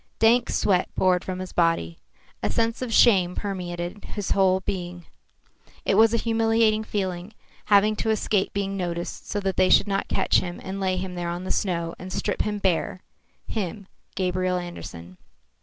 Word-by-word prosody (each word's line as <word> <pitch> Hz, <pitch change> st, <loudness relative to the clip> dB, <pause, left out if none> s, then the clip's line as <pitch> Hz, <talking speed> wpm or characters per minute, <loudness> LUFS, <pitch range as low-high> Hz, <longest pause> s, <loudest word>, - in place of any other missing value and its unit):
Dank 235 Hz, +2 st, +4 dB
sweat 185 Hz, -3 st, +1 dB
poured 185 Hz, -1 st, +2 dB
from 185 Hz, -1 st, -4 dB
his 185 Hz, 0 st, -7 dB
body. 165 Hz, -, +1 dB, 0.4 s
A -, -, 0 dB
sense 230 Hz, +1 st, 0 dB
of 250 Hz, -2 st, -3 dB
shame 190 Hz, -7 st, +5 dB
permeated 180 Hz, -1 st, -4 dB
his 205 Hz, -3 st, -5 dB
whole 190 Hz, -1 st, +3 dB
being. 175 Hz, -2 st, -5 dB, 0.8 s
It -, -, +2 dB
was 225 Hz, 0 st, +6 dB
a 230 Hz, -, +2 dB
humiliating 225 Hz, -1 st, +2 dB
feeling, 190 Hz, -2 st, -3 dB, 0.3 s
having 210 Hz, +1 st, +4 dB
to 225 Hz, -, -1 dB
escape 210 Hz, -2 st, +1 dB
being 195 Hz, -1 st, -2 dB
noticed 175 Hz, -2 st, -4 dB
so 205 Hz, -, -1 dB
that 195 Hz, -1 st, -2 dB
they 185 Hz, 0 st, +4 dB
should -, -, +5 dB
not 195 Hz, -1 st, -1 dB
catch -, -, +2 dB
him 175 Hz, -1 st, -5 dB
and 190 Hz, +1 st, -5 dB
lay 185 Hz, -1 st, 0 dB
him 185 Hz, 0 st, -4 dB
there 175 Hz, -1 st, -3 dB
on 175 Hz, +1 st, -4 dB
the 185 Hz, -, -4 dB
snow 170 Hz, -4 st, -1 dB
and 185 Hz, +1 st, -8 dB
strip 205 Hz, -, -2 dB
him 210 Hz, 0 st, -1 dB
bare 185 Hz, -1 st, 0 dB, 0.4 s
him, 205 Hz, -1 st, -4 dB, 0.3 s
Gabriel 185 Hz, -1 st, 0 dB
Andersen. 90 Hz, -, -8 dB
190 Hz, 175 wpm, -25 LUFS, 180-210 Hz, 0.8 s, was